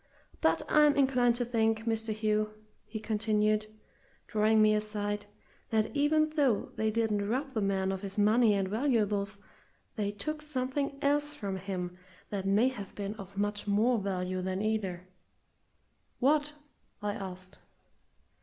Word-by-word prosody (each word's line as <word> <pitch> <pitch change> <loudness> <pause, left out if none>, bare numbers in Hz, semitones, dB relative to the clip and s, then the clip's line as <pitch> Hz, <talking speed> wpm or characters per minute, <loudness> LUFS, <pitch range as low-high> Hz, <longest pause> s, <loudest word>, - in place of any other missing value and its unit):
But - - +3
I'm 300 -1 +5
inclined 255 -3 +3
to 245 0 -1
think, 225 -2 +1
Mr. 225 -1 -1
Hugh," 215 0 0 0.3
he 220 0 -5
continued, 215 -1 +1 0.6
drawing 215 0 +3
me 215 0 +6
aside, 210 -1 -2 0.4
"that 220 +4 0
even 310 +2 +3
though 275 -9 +1
they 220 0 +1
didn't 215 -2 0
rob 270 +4 -1
the 220 - -1
man 195 -1 +1
of 190 -1 -4
his 195 0 -5
money 215 +1 +4
and 195 -1 0
valuables, 210 -3 0 0.6
they 205 -2 0
took 305 +10 -3
something 275 -1 -2
else 295 +1 +1
from 200 -7 -4
him 180 -2 -4 0.4
that 195 -2 -2
may 210 +6 +4
have 205 -7 -8
been 200 0 -3
of 195 -1 -10
much 205 +1 -1
more 220 +4 +3
value 185 -2 -2
than 185 +1 -2
either." 190 -5 -2 1.1
"What?" 295 +3 +2 0.5
I 205 0 0
asked. 185 -2 -8
215 Hz, 145 wpm, -30 LUFS, 200-245 Hz, 1.1 s, me